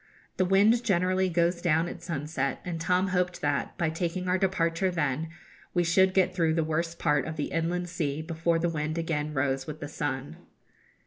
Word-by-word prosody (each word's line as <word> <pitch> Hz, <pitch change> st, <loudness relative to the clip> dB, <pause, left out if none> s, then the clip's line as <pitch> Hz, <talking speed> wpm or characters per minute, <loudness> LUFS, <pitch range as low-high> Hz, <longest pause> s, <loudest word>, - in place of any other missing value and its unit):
The 185 Hz, -, +3 dB
wind 205 Hz, +6 st, +4 dB
generally 185 Hz, -2 st, +2 dB
goes 170 Hz, 0 st, +1 dB
down 165 Hz, -1 st, +2 dB
at 175 Hz, -, -7 dB
sunset, 150 Hz, -5 st, -2 dB
and 170 Hz, -2 st, -4 dB
Tom 180 Hz, +3 st, +2 dB
hoped 180 Hz, -1 st, 0 dB
that, 145 Hz, -1 st, -1 dB
by 170 Hz, -3 st, 0 dB
taking 175 Hz, +2 st, -2 dB
our 185 Hz, +1 st, +2 dB
departure 180 Hz, -1 st, +1 dB
then, 160 Hz, -2 st, -1 dB, 0.5 s
we 175 Hz, -, +3 dB
should 185 Hz, +3 st, +3 dB
get 185 Hz, -1 st, +3 dB
through 165 Hz, -3 st, +1 dB
the 165 Hz, -, +2 dB
worst 165 Hz, +2 st, -2 dB
part 150 Hz, -3 st, +1 dB
of 160 Hz, -, -4 dB
the 150 Hz, -, -3 dB
Inland 175 Hz, +2 st, -1 dB
Sea 155 Hz, -4 st, -2 dB
before 165 Hz, +1 st, 0 dB
the 170 Hz, +1 st, +1 dB
wind 155 Hz, -1 st, -2 dB
again 155 Hz, -2 st, -1 dB
rose 135 Hz, -2 st, -1 dB
with 155 Hz, 0 st, -6 dB
the 145 Hz, -, -5 dB
sun. 145 Hz, -2 st, -4 dB
165 Hz, 190 wpm, -28 LUFS, 155-180 Hz, 0.5 s, wind